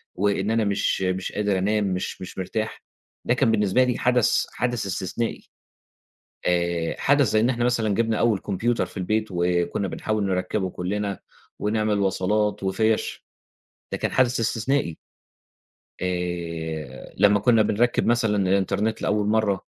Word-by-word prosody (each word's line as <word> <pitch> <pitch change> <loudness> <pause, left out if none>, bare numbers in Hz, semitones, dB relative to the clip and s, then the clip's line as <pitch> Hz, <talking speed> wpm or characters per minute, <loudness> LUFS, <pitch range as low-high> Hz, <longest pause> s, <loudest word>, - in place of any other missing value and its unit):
وإن 100 +1 0
أنا 115 0 +2
مش 100 -1 0
مش 95 0 -1
قادر 100 -2 0
أنام 105 +3 +1
مش 95 -2 -3
مش 95 - -8
مرتاح، 110 +4 -3 0.4
ده - - +3
كان 115 - +2
بالنسبة 105 +3 +3
لي 125 -1 0
حدث 125 -1 +2
حدث 120 -4 -1
استثنائي، 100 +4 -3 1.0
آآ 85 -2 0
حدث 140 -1 +3
زَي 110 - +3
إن 120 +3 +3
إحنا 120 -2 -1
مثلًا 115 -4 +1
جِبنا 115 0 +1
أول 115 -4 +2
كمبيوتر 115 +5 -1
في - - -17
البيت 110 +4 0
وكنا 90 +2 0
بنحاول 105 +3 -2
نركّبه 95 +1 -1
كُلّنا، 100 +2 -3 0.4
ونعمل 105 0 0
وصلات 100 +2 0
وفيَش، 110 +3 0 0.7
ده - - -2
كان - - -2
حدث 130 -1 +2
استثنائي. 115 - 0 1.1
آآ، 85 -5 -4
لمّا 105 +1 +5
كنا 115 0 +4
بنركّب 120 +4 +1
مثلًا 115 -3 +2
الانترنت 100 +3 +1
لأول 105 0 +1
مرّة، 105 -3 +1
105 Hz, 140 wpm, -24 LUFS, 95-110 Hz, 1.1 s, لمّا